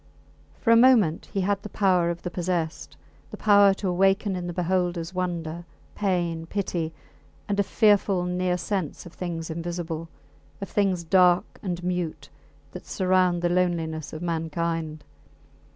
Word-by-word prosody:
For 230 - +2
a - - +8
moment 230 -9 +4
he 195 - -1
had 200 +1 0
the 210 - -8
power 185 -5 +2
of 170 0 -4
the 175 - -4
possessed 175 -3 -3 0.3
the - - -8
power 205 -2 +6
to 195 - -4
awaken 195 +2 +2
in 180 -1 -4
the - - -3
beholders 175 -1 -1
wonder, 175 -2 -3 0.3
pain, 175 -5 -1
pity, 175 -4 -2 0.6
and 205 0 -1
a - - +4
fearful 200 -3 +3
near 180 0 0
sense 185 -3 -3
of 175 - -11
things 165 -2 -5
invisible, 165 -1 -4 0.5
of 200 - -6
things 195 -5 +1
dark 180 +2 +3
and 180 -3 -4
mute, 175 -5 -3 0.4
that - - -10
surround 180 +2 +2
the 175 - +2
loneliness 165 -4 -1
of 155 +2 -7
mankind. 165 -1 -2
180 Hz, 150 wpm, -25 LUFS, 165-190 Hz, 0.6 s, a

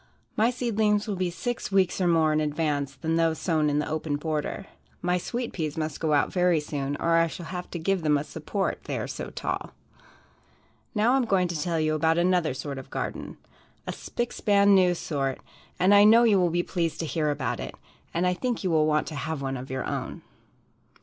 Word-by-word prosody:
My 225 +2 +3
seedlings 220 -4 +1
will 205 - -1
be 185 -1 -1
six 235 +5 -4
weeks 190 -1 +2
or 180 - +3
more 160 -2 +3
in 155 - +2
advance 150 -2 -1
than 160 +5 -1
those 165 -1 +2
sown 155 -4 +1
in 145 - 0
the 150 - 0
open 155 -1 -2
border. 155 +4 -3 0.3
My 180 +1 0
sweet 240 +6 -4
peas 155 -4 -3
must 155 -2 -3
go 155 -2 +1
out 145 - +2
very 180 -3 +3
soon 145 -1 -3
or 165 +2 +2
I 165 0 +4
shall 170 +1 -7
have 180 +1 -6
to - - -5
give 190 +3 0
them 150 -2 +3
a 145 - -2
support, 175 +6 -3
they - - -3
are - - -3
so - - -6
tall. - - -4 1.2
Now 220 +4 +3
I - - +4
am 260 - +1
going 190 -4 +2
to 165 -3 -3
tell 170 -1 0
you 155 0 +1
about 160 +1 +2
another 175 -5 +2
sort 140 0 -5
of 130 - -10
a - - -28
garden - - -5 0.5
"a - - -3
spick 240 0 -4
span 200 -1 +4
new" 180 -2 +5
sort 135 -5 -2 0.4
and 190 +3 +5
I 205 0 +8
know 225 +3 +7
you 215 -4 +5
will 180 -1 +3
be 175 +1 0
pleased 170 -3 -2
to - - -2
hear 155 -1 0
about 145 - -2
it, - - -6 0.4
and 170 +2 0
I 180 - +3
think 240 +5 -2
you 185 - 0
will 155 -1 +3
want 150 0 +2
to - - -8
have 150 0 -3
one 135 0 -2
of 130 +1 -7
your 130 0 -3
own. - - -4
165 Hz, 225 wpm, -26 LUFS, 150-190 Hz, 1.2 s, I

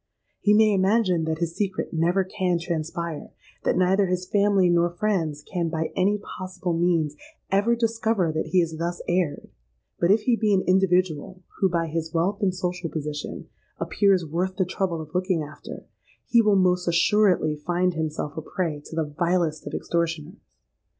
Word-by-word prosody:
He 210 0 +4
may 215 -1 +5
imagine 190 -3 +2
that 160 0 -1
his 170 0 -2
secret 195 -3 -2
never 175 +4 +2
can 185 -1 -1
transpire—that 170 -1 -4
neither 190 +2 +3
his 180 0 -2
family 200 -2 +3
nor 175 0 +3
friends 170 -6 -1
can, 170 -1 -2
by 160 0 -2
any 200 +3 +2
possible 185 -3 -5
means, 165 -3 +1 0.4
ever 205 +5 +3
discover 225 -6 0
that 155 - -2
he 185 - +3
has 160 -1 -3
thus 170 +2 -3
erred;—but, 170 - -3
if 210 +3 +5
he 245 - +3
be 215 -3 +2
an 185 - +1
individual, 185 -2 +1 0.2
who, 190 - +3
by 170 -1 0
his 160 +1 -4
wealth 195 +6 0
and 190 -2 +1
social 180 -1 -3
position, 150 -1 -5 0.3
appears 195 -4 +2
worth 180 +5 -2
the 190 - +1
trouble 175 -2 -2
of 155 -1 -11
looking 180 -3 0
after, 150 +1 -10 0.4
he 235 - +4
will 210 -2 +3
most 180 -1 +2
assuredly 170 -2 +3
find 175 +4 0
himself 155 -2 -3
a 160 - -4
prey 160 -2 -3
to - - -9
the 165 - +1
vilest 160 0 -1
of - - -6
extortioners. 170 +2 -2
180 Hz, 165 wpm, -25 LUFS, 165-190 Hz, 0.4 s, may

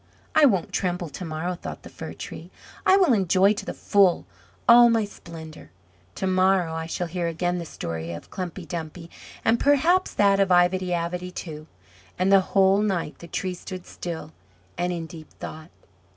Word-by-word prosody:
"I 310 - +6
won't 195 - +1
tremble 180 -2 -1
to 145 - -8
morrow," 160 +3 -3
thought 175 - -8
the - - -10
Fir - - -8
tree. - - -9 0.4
"I 380 - +7
will 365 -10 +4
enjoy 195 0 +4
to 205 - -6
the - - -3
full 195 - +3 0.4
all 240 0 +8
my 225 -2 +2
splendour. 160 - -11 0.5
To - - -3
morrow 185 -2 +2
I 160 0 -4
shall 175 +2 -2
hear 170 0 -3
again 175 +2 -1
the 170 - -6
story 85 - -5
of 85 - -9
Klumpy 180 -1 -5
Dumpy, 165 0 -6 0.3
and 230 +1 +3
perhaps 320 +7 +3
that 200 -1 +4
of 195 -1 +3
Ivedy 180 +1 +3
Avedy, 175 +1 -2
too." 155 -4 -8 0.5
And 185 +2 +2
the 195 -1 +7 0.2
whole 195 +1 +5
night 190 -7 -2
the 170 - -10
Tree 185 +2 -3
stood 185 0 -8
still 170 - -6 0.4
and 175 +1 -1
in 170 -2 -3
deep 160 -2 -12
thought. 155 +1 -9
180 Hz, 180 wpm, -25 LUFS, 165-195 Hz, 0.5 s, all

